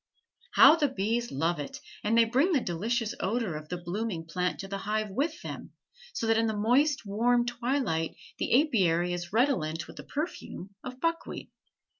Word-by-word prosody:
How - - +9
the 300 -3 +3
bees 235 0 -1
love 160 +4 0
it, 145 - -6 0.2
and 225 +2 +2
they 230 - +7
bring 270 +11 +2
the 290 - +4
delicious 225 +4 -1
odor 215 -4 -1
of 155 0 -8
the 180 - -3
blooming 175 0 -3
plant 180 +2 -2
to 195 - -7
the 195 0 -4
hive 210 +1 -2
with 295 +10 -2
them, - - -7 0.4
so 235 - -3
that 225 0 +3
in 225 - +2
the 220 -1 -1
moist 260 +5 +2
warm 240 +4 +2
twilight 240 - -1 0.2
the 265 +5 +4
apiary 180 - +1
is 175 -1 -5
redolent 185 - +1
with - - -13
the - - -7
perfume 280 - -5
of 255 0 -7
buckwheat. 330 +2 -2
220 Hz, 180 wpm, -29 LUFS, 180-250 Hz, 0.4 s, How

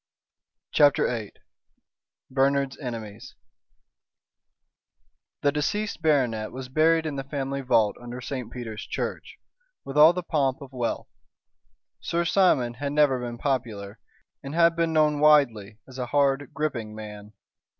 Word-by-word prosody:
CHAPTER 145 -2 +4
VIII 110 -4 -3 1.0
BERNARD'S 135 0 +1
ENEMIES 115 -5 -7 2.1
The 145 - +4
deceased 200 +8 -2
baronet 125 -9 +1
was 130 0 -7
buried 160 +3 +3
in 150 -3 -3
the 135 - -3
family 140 0 -3
vault 110 -5 +2
under 120 +1 -7
St. 125 -1 -5
Peter's 115 -4 -6
Church, - - -5 0.5
with 140 +2 -1
all 155 +2 +9
the 180 0 -4
pomp 140 -6 0
of 140 -1 -12
wealth. 120 -2 -3 0.9
Sir 170 0 -1
Simon 160 -10 +3
had 140 +3 -4
never 145 -4 +3
been 120 -1 -5
popular, 115 -6 -3 0.4
and 140 +3 -7
had 170 0 +4
been 165 -1 0
known 150 -2 +2
widely 120 -9 +3
as 130 0 -11
a 125 - -2
hard, 140 0 +1
gripping 120 -9 -3
man. 105 -1 -9
135 Hz, 130 wpm, -26 LUFS, 120-150 Hz, 2.1 s, all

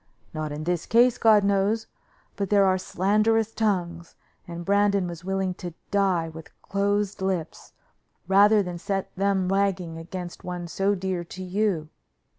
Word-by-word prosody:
Not 155 -1 -4
in 150 +1 -5
this 175 0 -2
case, 240 +1 +4
God 215 -2 +5
knows, 200 +3 +1 0.5
but 200 -2 -3
there 200 -1 +5
are 185 0 +2
slanderous 215 +4 +1
tongues, 175 -6 -2 0.3
and 170 0 -7
Brandon 200 -1 +2
was 170 -1 -7
willing 190 0 -1
to 175 -3 -6 0.2
die 190 -5 +2
with 160 0 -12
closed 205 0 -1
lips, 185 -4 -3 0.5
rather 205 +2 +5
than 175 -2 -6
set 195 +1 -3
them 195 -1 +1
wagging 190 -4 0
against 175 +1 -7
one 175 -1 -5
so 195 +4 0
dear 185 -2 -3
to 185 +2 -8
you. 185 -4 -1
190 Hz, 150 wpm, -25 LUFS, 175-205 Hz, 0.5 s, God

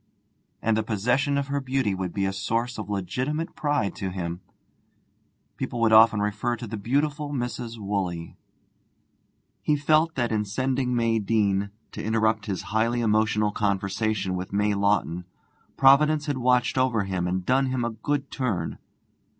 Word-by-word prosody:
And 110 0 +2
the 110 - +2
possession 125 +7 +1
of 140 - 0
her 140 0 -1
beauty 130 -5 0
would 95 -2 -3
be 100 +1 -1
a 95 - -1
source 115 +4 -2
of 105 -1 -6
legitimate 125 - -2
pride 145 -9 0
to 95 - -3
him. 90 -1 -4 1.2
People 120 - -4
would 110 -1 +4
often 110 -1 +7
refer 105 +3 -1
to 120 - -7
the 110 0 -5
beautiful 145 +7 -1
Mrs. 120 -3 -4
Woolley. 95 -5 -3 1.3
He 150 - +2
felt 155 +3 +2
that 120 -3 0
in 105 -1 +1
sending 130 +4 -1
May 115 -1 +2
Deane 100 -2 +1 0.2
to - - -6
interrupt 110 -1 +1
his 95 -3 -3
highly 115 +2 +1
emotional 105 -1 +2
conversation 100 -1 -1
with 90 0 -5
May 105 +1 +1
Lawton 100 -4 0 0.5
Providence 150 +3 +5
had 145 -3 -2
watched 125 +1 +2
over 125 -5 +2
him 95 -2 -2
and 90 0 -2
done 135 +1 +2
him 130 -2 -1
a 120 - -1
good 140 +6 -3
turn. 105 -11 -2
110 Hz, 160 wpm, -25 LUFS, 100-130 Hz, 1.3 s, often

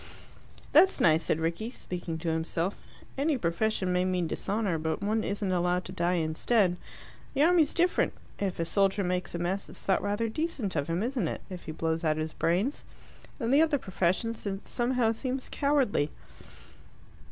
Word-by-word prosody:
"That's 365 +6 +6
nice," 160 0 +4
said 155 - +1
Rickie, 170 +8 -2
speaking 175 -8 -5
to 165 +1 -3
himself. 165 +3 -1 0.4
"Any 290 0 +2
profession 185 0 0
may 180 0 +2
mean 185 -1 0
dishonour, 195 0 -1
but 160 +4 -2
one 215 +2 +1
isn't 200 -1 -1
allowed 180 0 +1
to - - -6
die 180 -1 +1
instead. 175 +4 +2 0.6
The 280 - +4
army's 330 -2 +4
different. 350 +1 +2 0.3
If 195 -4 -2
a 165 - +1
soldier 195 +2 +2
makes 180 -1 -2
a - - 0
mess, 180 +3 -2
it's - - -9
thought 190 - +2
rather 205 +3 0
decent 255 - -2
of 145 -1 0
him, 170 +4 -1
isn't 240 -7 -1
it, - - -4
if 180 -1 -7
he 155 - -4
blows 160 +1 -1
out 155 -1 +2
his 155 0 -3
brains? 190 - 0 0.6
In 230 +1 -1
the 285 +3 +6
other 315 -2 +3
professions 190 +2 -1
it 195 0 -4
somehow 240 -2 +1
seems 255 +3 -3
cowardly." 275 - +2
190 Hz, 175 wpm, -29 LUFS, 170-235 Hz, 0.6 s, That's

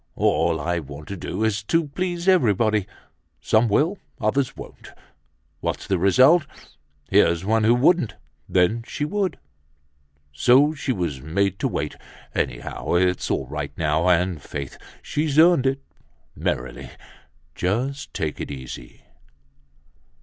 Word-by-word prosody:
All 80 - +1
I 85 +3 -1
want 75 0 -10
to 100 - -4
do 100 +3 -4
is 110 -2 +1
to 165 +6 +1
please 175 +3 -3
everybody. 110 - +3 0.5
Some 110 +8 +2
will, 165 - +1 0.2
others 125 +5 0
won't. - - -11 0.7
What's - - -3
the 95 -3 0
result? 130 - +5 0.6
Here's 85 +2 +3
one 110 +1 +2
who 115 +2 +5
wouldn't, 140 - +3 0.3
then 95 +6 +2
she 145 - -3
would. 195 +3 -1 1.0
So 130 - +4
she 145 -3 -3
was 85 - -2
made 95 +6 -1
to - - +1
wait. - - -3 0.4
Anyhow, 60 +6 -2
it's 90 0 +1
all 70 - 0
right 70 +1 -6
now, 80 +3 +1
and 90 -2 +1
faith! 70 -2 -6 0.3
She's 150 -1 -1
earned 165 -4 +6
it! 135 +1 -1 0.5
Merrily, - - -3 0.6
just 125 - -2
take 75 -2 -3
it - - -5
easy." 65 -3 -9
105 Hz, 130 wpm, -23 LUFS, 85-140 Hz, 1.0 s, earned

